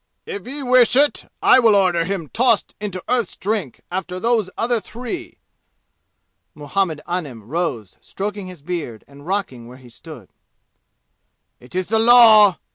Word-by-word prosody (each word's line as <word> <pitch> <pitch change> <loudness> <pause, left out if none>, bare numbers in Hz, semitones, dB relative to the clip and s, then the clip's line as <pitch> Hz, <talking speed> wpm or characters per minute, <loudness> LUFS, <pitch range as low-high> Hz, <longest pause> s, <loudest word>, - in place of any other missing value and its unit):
"If 420 - -7
Ye 280 +2 -6
wish 250 -2 +4
it, 290 +2 +1
I - - +6
will 225 -4 +4
order 180 -4 +2
him 185 -4 -4
tossed 235 -3 +1
into 190 -4 -5
Earth's 240 -5 -1
Drink 200 - -3
after 180 0 -4
those 225 -3 0
other 235 0 0
three." 245 - -8 1.2
Muhammed 155 +1 -2
Anim 150 -11 -5
rose 120 - -4
stroking 200 -1 -6
his 180 -6 -12
beard 155 -10 -5
and 140 +2 -16
rocking 180 -12 -3
where 125 +1 -13
he 130 -2 -16
stood. - - -13 1.3
"It 125 +8 -14
is 185 0 -1
the 220 +3 0
law!" 220 -4 +7
195 Hz, 145 wpm, -20 LUFS, 165-230 Hz, 1.3 s, law